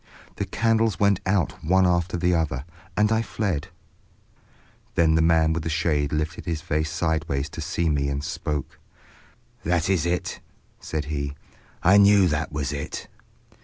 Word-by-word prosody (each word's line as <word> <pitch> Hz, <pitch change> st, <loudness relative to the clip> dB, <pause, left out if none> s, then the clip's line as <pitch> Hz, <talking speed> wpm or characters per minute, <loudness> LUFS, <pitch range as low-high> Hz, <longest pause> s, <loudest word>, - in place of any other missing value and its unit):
"The -, -, -1 dB
candles 115 Hz, -3 st, +1 dB
went 100 Hz, -2 st, +3 dB
out 95 Hz, -4 st, 0 dB
one 95 Hz, +3 st, +4 dB
after 85 Hz, -1 st, +1 dB
another, 80 Hz, -6 st, 0 dB, 0.3 s
and 105 Hz, +1 st, +3 dB
I 110 Hz, 0 st, +3 dB
fled—" 100 Hz, -8 st, -2 dB, 1.3 s
Then 80 Hz, -1 st, +4 dB
the 80 Hz, -, +4 dB
man 80 Hz, -1 st, +4 dB
with 80 Hz, -, -2 dB
the 80 Hz, -, -3 dB
shade 80 Hz, -3 st, 0 dB
lifted 75 Hz, +1 st, -2 dB
his 85 Hz, -4 st, -2 dB
face 80 Hz, -2 st, -1 dB
sideways 80 Hz, -3 st, -1 dB
to 80 Hz, -, -7 dB
see 85 Hz, +2 st, -1 dB
me 70 Hz, -2 st, +1 dB
and 70 Hz, +1 st, -3 dB
spoke. 75 Hz, -2 st, -4 dB, 0.8 s
"That 85 Hz, +2 st, +1 dB
is 85 Hz, -3 st, +1 dB
it," 90 Hz, +1 st, -2 dB, 0.4 s
said 75 Hz, -2 st, -4 dB
he. 70 Hz, -1 st, -3 dB, 0.5 s
"I 95 Hz, +3 st, +6 dB
knew 100 Hz, -1 st, +6 dB
that 75 Hz, +1 st, -1 dB
was 75 Hz, -2 st, -2 dB
it. 70 Hz, +1 st, -5 dB
80 Hz, 155 wpm, -24 LUFS, 75-90 Hz, 1.3 s, I